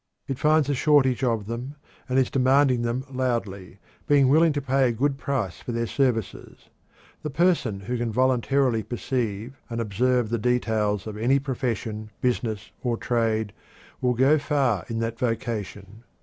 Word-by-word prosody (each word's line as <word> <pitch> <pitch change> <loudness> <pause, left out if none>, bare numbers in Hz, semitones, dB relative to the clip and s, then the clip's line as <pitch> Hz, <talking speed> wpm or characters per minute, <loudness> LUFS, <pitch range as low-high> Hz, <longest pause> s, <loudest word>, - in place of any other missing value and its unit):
It 135 -2 -4
finds 155 -1 +3
a 145 - +1
shortage 135 -2 +3
of 115 -5 0
them, 120 +6 -5 0.3
and 130 - +1
is 130 -1 +2
demanding 130 -1 +3
them 120 +2 -2
loudly, 115 -8 -3 0.3
being 140 -3 +4
willing 160 +3 +5
to 145 - -1
pay 135 -1 +2
a - - +1
good 135 +4 -1
price 120 -12 -2
for 120 - -6
their 115 0 -1
services. 120 -4 -2 0.5
The 150 - -4
person 140 - +1
who 120 +5 -3
can 120 -1 -1
voluntarily 130 0 +2
perceive 120 +1 -4
and 115 -1 -3
observe 120 +2 +1
the 115 0 -1
details 110 -4 0
of 110 -1 -6
any 125 +5 +3
profession, 115 -5 -3
business, 110 -4 -2
or 120 -2 -1
trade 110 -3 0 0.5
will 125 -1 +1
go 135 +5 +4
far 135 - 0
in 115 - -3
that 115 0 -3
vocation. 110 -4 -4
125 Hz, 160 wpm, -25 LUFS, 110-135 Hz, 0.5 s, willing